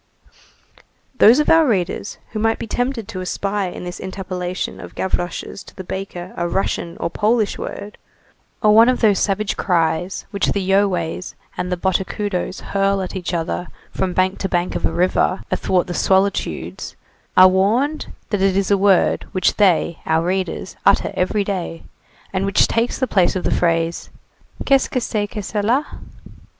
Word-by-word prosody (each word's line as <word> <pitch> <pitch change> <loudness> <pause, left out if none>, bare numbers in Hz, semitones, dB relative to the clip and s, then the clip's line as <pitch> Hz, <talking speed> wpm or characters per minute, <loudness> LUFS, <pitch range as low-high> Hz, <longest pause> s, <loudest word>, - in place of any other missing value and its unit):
Those 230 +4 +8
of 300 - +1
our 325 -2 +5
readers 195 -3 -1
who 215 - -4
might 225 +1 +1
be - - -5
tempted 245 0 -2
to 195 -5 -6
espy 195 +2 -2
in - - -8
this 180 0 -6
interpellation 185 -1 -4
of - - -10
Gavroche's 175 0 -3
to - - -15
the 190 - -7
baker 185 -1 -6
a 175 - -1
Russian 170 -2 -2
or - - -4
a - - +1
Polish 215 +3 +1
word, 205 +1 -7 0.6
or 210 -1 +6
one 225 +3 +7
of 255 - 0
those 210 -4 +4
savage 205 +1 0
cries 175 0 0
which 200 -1 0
the 200 - 0
Yoways 185 -3 0 0.2
and 180 0 -3
the 180 - 0
Botocudos 190 +1 -2
hurl 195 0 0
at 185 - -6
each 180 -2 -3
other 175 +1 -2 0.2
from 185 -1 -2
bank 185 +1 +1
to 195 - -2
bank 175 0 0
of - - 0
a - - -4
river, 185 +1 +1
athwart 180 -2 +1
the 180 - -5
solitudes, 195 +2 0 0.4
are 185 - +10
warned 225 +11 +1 0.2
that 205 -3 0
it 195 -1 +3
is 195 -1 0
a 200 - +5
word 195 -2 +3
which 185 - +1
they 180 -4 +3
[our 160 +1 +2
readers] 185 0 -2
utter - - +3
every 200 +3 0
day, 185 -4 -4 0.5
and 190 +1 0
which 195 - +4
takes 230 +1 0
the 260 - +1
place 195 -8 +2
of 185 - -2
the - - 0
phrase: 165 -1 0 0.6
"Qu'est 275 -1 +4
ce - - -6
que 255 - -1
c'est 210 -3 -1
que 210 0 -6
cela?" 225 +8 0
190 Hz, 175 wpm, -20 LUFS, 180-210 Hz, 0.6 s, are